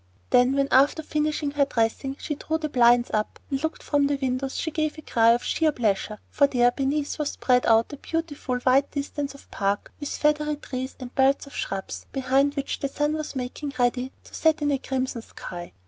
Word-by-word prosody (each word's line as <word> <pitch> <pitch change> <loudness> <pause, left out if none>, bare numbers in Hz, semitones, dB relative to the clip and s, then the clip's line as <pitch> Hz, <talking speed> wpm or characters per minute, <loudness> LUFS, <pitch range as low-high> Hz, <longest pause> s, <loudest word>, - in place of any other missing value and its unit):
Then, 250 +1 +5
when, 275 0 +2
after 280 +4 +4
finishing 300 -1 -1
her 285 -1 +2
dressing, 250 +2 -1
she 300 - -3
drew 315 +2 -2
the 310 -1 -3
blinds 240 -2 +4
up 215 0 -1
and 270 0 -1
looked 320 +1 -3
from 285 -1 +2
the 285 - +1
windows, 265 0 -2
she 320 - -2
gave 310 0 -1
a 310 - -9
cry 230 -4 +3
of 240 - -1
sheer 320 -1 +2
pleasure, 215 -4 -1
for 285 - +4
there 245 -2 +3
beneath 285 +4 -1
was 295 -1 -1
spread 250 -1 +2
out 225 +4 +4
a - - -6
beautiful 295 -5 -3
wide 265 +2 +4
distance 285 0 -4
of 280 - -17
Park 200 0 -1
with 290 - -4
feathery 300 0 +1
trees 260 -2 -6
and 255 -1 -8
belts 270 +2 +3
of 280 - -13
shrubs, 195 -1 -4
behind 270 +2 +2
which 280 -1 -3
the 275 - -1
sun 295 +2 -1
was 310 -2 -4
making 265 +2 -4
ready 250 +1 +1
to - - -17
set 315 -1 +2
in 290 - +2
a 275 - +1
crimson 260 -3 -2
sky. 175 -5 -9
275 Hz, 210 wpm, -25 LUFS, 250-295 Hz, -, Then